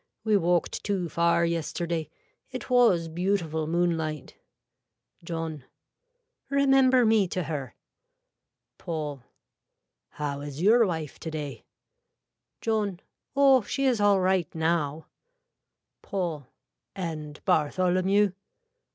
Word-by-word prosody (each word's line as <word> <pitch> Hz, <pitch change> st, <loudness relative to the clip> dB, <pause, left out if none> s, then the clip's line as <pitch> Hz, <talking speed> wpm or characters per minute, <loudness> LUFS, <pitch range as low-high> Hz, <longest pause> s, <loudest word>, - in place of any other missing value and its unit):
We 215 Hz, -2 st, +2 dB
walked 175 Hz, -3 st, +1 dB
too 190 Hz, -4 st, -1 dB
far 170 Hz, +1 st, +2 dB
yesterday. 170 Hz, 0 st, -2 dB, 0.4 s
It 255 Hz, -1 st, -7 dB
was 230 Hz, -10 st, +4 dB
beautiful 165 Hz, -2 st, -1 dB
moonlight. 165 Hz, -3 st, -1 dB, 0.9 s
(John.) 165 Hz, -4 st, -5 dB, 0.9 s
Remember 270 Hz, -2 st, +4 dB
me 220 Hz, -3 st, +4 dB
to 180 Hz, +1 st, -2 dB
her. 145 Hz, -5 st, -5 dB, 1.0 s
(Paul.) 150 Hz, -5 st, -4 dB, 0.9 s
How 145 Hz, -2 st, -4 dB
is 145 Hz, 0 st, -7 dB
your 220 Hz, +5 st, +5 dB
wife 160 Hz, -5 st, -4 dB
today. 150 Hz, -6 st, -6 dB, 1.0 s
(John.) 210 Hz, -5 st, -1 dB, 0.4 s
Oh 275 Hz, -2 st, +6 dB
she 275 Hz, +6 st, -2 dB
is 245 Hz, -5 st, +2 dB
all 205 Hz, -1 st, +4 dB
right 185 Hz, -2 st, +1 dB
now. 160 Hz, -2 st, 0 dB, 1.0 s
(Paul.) 170 Hz, -8 st, -3 dB, 0.5 s
And 155 Hz, -5 st, -5 dB
Bartholomew. 185 Hz, +6 st, +2 dB
170 Hz, 95 wpm, -27 LUFS, 155-205 Hz, 1.0 s, Oh